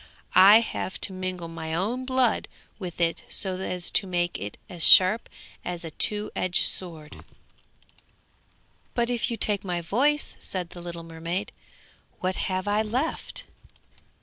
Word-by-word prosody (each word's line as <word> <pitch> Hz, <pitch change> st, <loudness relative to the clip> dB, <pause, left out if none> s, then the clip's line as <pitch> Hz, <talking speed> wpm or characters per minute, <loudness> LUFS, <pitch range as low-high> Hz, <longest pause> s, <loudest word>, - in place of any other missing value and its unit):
I 200 Hz, +4 st, +9 dB
have 205 Hz, -4 st, -4 dB
to 195 Hz, -, +1 dB
mingle 185 Hz, -2 st, -4 dB
my 160 Hz, -1 st, -5 dB
own 230 Hz, +9 st, -1 dB
blood 255 Hz, -3 st, +1 dB, 0.3 s
with 180 Hz, -4 st, -7 dB
it 165 Hz, -1 st, +1 dB
so 185 Hz, -2 st, -1 dB
as 180 Hz, -2 st, -1 dB
to 195 Hz, -, +2 dB
make 175 Hz, -1 st, -1 dB
it 100 Hz, +2 st, -6 dB
as 175 Hz, -3 st, -4 dB
sharp 190 Hz, +5 st, +7 dB, 0.3 s
as 175 Hz, -1 st, -5 dB
a 160 Hz, -, -6 dB
two 210 Hz, +6 st, 0 dB
edged 185 Hz, -1 st, +3 dB
sword.' 160 Hz, -5 st, -6 dB, 1.7 s
'But 235 Hz, 0 st, +1 dB
if 240 Hz, -2 st, 0 dB
you 230 Hz, -, -2 dB
take 205 Hz, -3 st, +1 dB
my 180 Hz, -2 st, -2 dB
voice,' 275 Hz, -, +1 dB
said 180 Hz, -3 st, -4 dB
the 175 Hz, -, -9 dB
little 170 Hz, -1 st, -7 dB
mermaid, 165 Hz, +3 st, -4 dB, 0.7 s
'what 185 Hz, 0 st, -1 dB
have 185 Hz, +1 st, -2 dB
I 205 Hz, +1 st, +2 dB
left?' 250 Hz, +9 st, -2 dB
185 Hz, 150 wpm, -26 LUFS, 175-215 Hz, 1.7 s, I